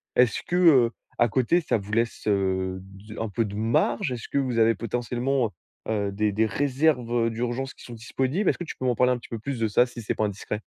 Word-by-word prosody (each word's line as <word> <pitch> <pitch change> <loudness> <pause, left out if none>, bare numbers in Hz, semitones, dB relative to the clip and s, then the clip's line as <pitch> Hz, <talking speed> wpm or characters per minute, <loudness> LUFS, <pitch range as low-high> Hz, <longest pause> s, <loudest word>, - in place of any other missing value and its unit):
est-ce 125 -4 +3
que, 175 - -2
heu, 140 -10 +6 0.3
à 120 - +5
côté, 130 +10 +2
ça 145 - +1
vous 105 0 -8
laisse, 115 0 0
heu, 95 -2 0
du 100 +3 -11
un 110 -1 -2
peu 115 +3 0
de 100 -1 -6
marge? 115 +4 +1
Est-ce 120 -2 -5
que - - -1
vous 130 -4 -1
avez 115 0 +5
potentiellement, 120 +2 -1 0.4
heu - - +1
heu, 100 -2 0
des 105 +1 0
des 110 +3 +2
réserves 125 -3 +1
d'urgence 120 +3 -3
qui - - -15
sont 120 - -9
disponibles? 130 - -1
Est-ce - - 0
que - - -5
tu 165 - -7
peux 130 - -4
m'en 125 - +2
parler 125 +2 +3
un 125 - -2
petit - - -13
peu 115 - -5
plus 135 +2 -4
de 115 - +2
ça 120 +4 +4
si 120 -1 -9
c'est 105 - -2
pas 110 - +1
indiscret? 105 +1 -4
115 Hz, 245 wpm, -25 LUFS, 105-130 Hz, 0.4 s, heu